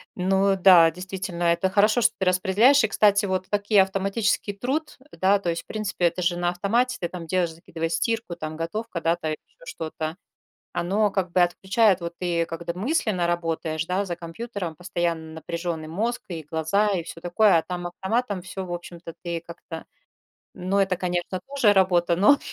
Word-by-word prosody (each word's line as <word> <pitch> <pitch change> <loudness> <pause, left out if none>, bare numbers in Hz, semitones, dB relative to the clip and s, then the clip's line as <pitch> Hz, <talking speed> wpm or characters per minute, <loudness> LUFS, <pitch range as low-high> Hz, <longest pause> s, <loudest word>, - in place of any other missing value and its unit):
Ну 195 +1 +2
да, 175 -3 +7
действительно, 180 0 -5
это 170 +2 +2
хорошо, 210 +4 +4
что 230 0 +4
ты 190 - 0
распределяешь. 205 +9 +4
И, - - +3
кстати, 205 -1 +3
вот 185 -1 -2
такие 205 0 +3
автоматический 195 +2 0
труд, 265 +11 -3
да, 195 +2 +2
то 180 - -2
есть, 170 0 -2
в - - -49
принципе, 210 -5 -2
это 170 +2 +1
же 175 0 +1
на 175 0 +1
автомате 235 +8 0
ты 175 - -2
там 175 -2 -7
делаешь, 175 0 0
закидываешь 165 0 -5
стирку, 225 +1 -1
там 155 -2 -6
готовка, 170 +3 -4
да, 165 +1 +2
там 160 -2 -4
ещё - - -10
что-то. 160 - -5 0.6
Оно 205 +4 +1
как 190 -3 -2
бы 180 - +3
отключает, 190 +3 +2
вот 170 0 -5
ты, 170 -2 0
когда 170 0 -5
мысленно 210 - 0
работаешь, 165 -2 -2
да, 190 +3 0
за 175 - -3
компьютером 175 0 -6
постоянно 170 -2 -3
напряжённый 165 0 -4
мозг, 225 +9 -2
и 165 -4 -6
глаза, 160 +7 +1
и 175 - -1
всё 165 0 -10
такое, 175 +2 +4
а, - - 0
там 175 0 -5
автоматом 200 +3 -2
всё, 190 +1 -6
в 175 - -7
общем-то, 170 -1 -8
ты 170 -1 -3
как-то 170 -1 -9 0.7
ну, 185 +2 -1
это, 190 -2 +2
конечно, 180 0 -2
тоже 275 -7 +3
работа, 175 -3 +3
но. 210 +11 +5
180 Hz, 180 wpm, -24 LUFS, 170-200 Hz, 0.7 s, да